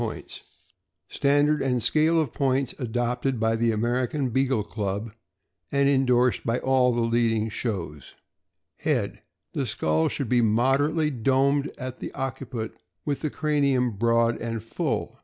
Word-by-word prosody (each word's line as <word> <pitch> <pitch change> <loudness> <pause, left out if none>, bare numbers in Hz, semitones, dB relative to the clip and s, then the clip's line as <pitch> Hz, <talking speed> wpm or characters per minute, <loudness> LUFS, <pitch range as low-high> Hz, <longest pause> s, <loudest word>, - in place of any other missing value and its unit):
287 - - -6 0.6
Standard 145 +1 +2
and 125 -3 0
scale 160 +2 +3
of 155 -6 -1
points 135 -1 0
adopted 125 +1 -1
by 115 0 +2
the 115 0 +2
American 125 +5 0
Beagle 130 -2 +1
Club, 105 +1 -4 0.6
and 140 0 +3
indorsed 125 -3 +3
by 115 +1 0
all 130 -1 +3
the 120 0 0
leading 115 -1 +1
shows: 85 - -5 0.6
Head. - - -1 0.2
— - - -55
The - - -1
skull 80 +1 +1
should 140 - -3
be 120 +1 +3
moderately 135 +8 +2
domed 135 +3 +1
at 130 -1 -6
the - - -6
occiput, 125 -4 -4 0.3
with 145 - -2
the 155 - -1
cranium 140 -5 +1
broad 115 +2 +2
and 115 -2 -3
full. 115 - -3
125 Hz, 140 wpm, -25 LUFS, 115-135 Hz, 0.6 s, scale